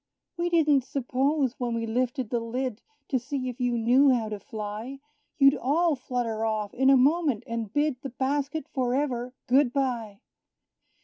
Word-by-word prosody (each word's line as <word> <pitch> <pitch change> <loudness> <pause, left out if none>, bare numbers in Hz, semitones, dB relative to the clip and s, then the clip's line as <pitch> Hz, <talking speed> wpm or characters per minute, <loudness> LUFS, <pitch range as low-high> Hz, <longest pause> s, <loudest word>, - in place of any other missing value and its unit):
We 345 0 -1
didn't 300 -5 +3
suppose, 270 0 -1
when 240 -2 -1
we 230 0 -2
lifted 245 +1 -1
the 240 - +1
lid, 240 0 -3 0.3
To 260 - +1
see 255 +1 -4
if 250 +1 -8
you 245 -1 +1
knew 250 +5 +4
how 235 -4 +1
to 210 -1 -5
fly, 220 +3 -6 0.4
You'd 275 -1 +6
all 315 +4 +1
flutter 245 -4 -3
off 215 -2 -1
in 265 +1 +3
a 270 - +7
moment, 280 -3 +2
and 230 -3 -4
bid 290 -1 0
The 275 - -5
basket 280 +3 -2
for 250 -2 0
ever 250 -3 -2
good 260 0 +3
by! 240 -7 -2
255 Hz, 170 wpm, -27 LUFS, 230-275 Hz, 0.4 s, a